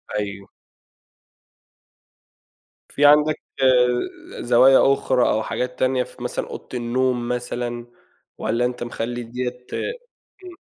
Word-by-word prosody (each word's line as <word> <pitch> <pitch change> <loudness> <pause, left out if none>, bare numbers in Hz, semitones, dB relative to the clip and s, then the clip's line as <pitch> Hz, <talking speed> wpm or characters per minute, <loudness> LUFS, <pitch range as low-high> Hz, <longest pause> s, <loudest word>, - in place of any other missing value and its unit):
أيوه. 100 -1 -4 2.4
في 145 - +1
عندك 150 +1 +5 1.0
زوايا 130 +3 +5
أخرى 130 -2 +1
أو 110 - +1
حاجات 125 +2 -4
تانية 130 0 +2
ف - - -16
مثلًا - - -3
أوضة - - -8
النوم 125 0 0
مثلًا، 120 -1 -4 0.5
والّا 120 +1 0
أنتَ 125 0 -3
مخلّي 120 0 -4
دِيَّة 125 +1 -5 0.8
امم. 360 0 -11
125 Hz, 100 wpm, -22 LUFS, 120-130 Hz, 2.4 s, عندك